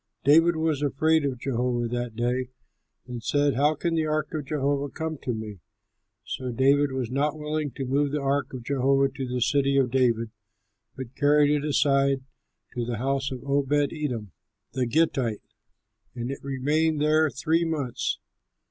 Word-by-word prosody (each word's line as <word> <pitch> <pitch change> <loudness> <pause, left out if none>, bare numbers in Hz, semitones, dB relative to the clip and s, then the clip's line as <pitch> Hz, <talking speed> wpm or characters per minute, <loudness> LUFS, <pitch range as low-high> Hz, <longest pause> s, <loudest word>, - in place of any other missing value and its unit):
David 165 +4 +5
was 160 -3 0
afraid 155 +2 +2
of 135 -3 -2
Jehovah 120 -1 -1
that 120 -1 -3
day, 125 +2 -1 0.6
and 120 -2 -6
said, 145 +4 +1
"How 145 +4 +2
can 170 +3 -2
the 160 -1 +1
ark 155 0 -1
of 150 -3 -4
Jehovah 140 -1 0
come 160 +1 -5
to 125 - -3
me?" 110 -4 -6 0.7
So 130 -1 -4
David 140 +3 +3
was 130 -3 -3
not 145 +3 0
willing 150 0 -2
to 135 - -3
remove 140 +2 +1
the 150 - 0
ark 140 0 0
of 130 -3 -7
Jehovah 135 +1 +2
to 135 -1 -5
the 125 0 -3
City 140 +2 +2
of 130 -3 +2
David, 115 -4 +1 0.6
but 130 -1 -8
carried 145 0 +4
it 150 -1 +1
aside 140 -2 +2 0.5
to 120 -2 -2
the 115 -1 -3
house 135 +2 -1
of 125 -2 -6
Obed 140 0 0 0.2
edom, 125 - -4 0.4
the 130 -2 -1
Gittite, 125 -5 +1 0.7
and 120 +1 -4
it 135 - -7
remained 145 +4 0
there 155 +1 +3
three 160 +5 0
months. 150 -7 -2
140 Hz, 165 wpm, -26 LUFS, 125-150 Hz, 0.7 s, David